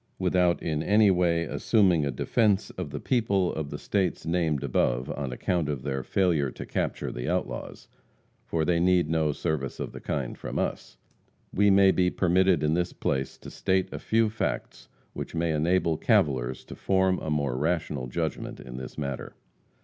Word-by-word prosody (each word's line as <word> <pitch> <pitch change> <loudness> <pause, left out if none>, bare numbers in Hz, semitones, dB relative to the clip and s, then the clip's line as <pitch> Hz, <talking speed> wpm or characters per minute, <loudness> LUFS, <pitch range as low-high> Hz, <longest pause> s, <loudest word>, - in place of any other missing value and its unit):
Without 90 -1 +2
in 75 -2 -1
any 105 +3 +4
way 85 -2 +2
assuming 90 -6 +2
a - - -1
defence 105 - +1
of 90 -5 -5
the 70 0 -5
people 100 - +1
of 80 -2 -4
the - - -5
states 95 -6 -1
named 80 -4 0
above, 60 -1 0
on 70 -3 -4
account 80 +4 -1
of 70 -4 -3
their 65 -2 -2
failure 80 -3 +1
to - - -8
capture - - -2
the - - -4
outlaws 60 0 -3 0.6
for 80 -1 -1
they 85 0 +2
need 90 -2 +3
no 80 -2 +2
service 75 -2 -3
of - - -4
the - - -8
kind - - -3
from - - -5
us - - -3 0.6
we 100 +1 +4
may 95 0 +6
be 90 -1 +2
permitted 90 -2 +2
in 75 +1 +2
this 90 +1 0
place 65 -1 -2
to - - -11
state 95 -1 0
a - - -4
few 115 0 +2
facts 60 - -4 0.3
which - - -6
may 85 0 0
enable 80 +1 +1
cavilers 65 -4 +1
to - - -9
form 95 -1 +1
a 80 - -5
more 70 -4 0
rational 75 -3 -1
judgment 60 - -3
in 60 -1 -9
this 65 0 -8
matter. 70 -3 -5
80 Hz, 180 wpm, -27 LUFS, 70-95 Hz, 0.6 s, may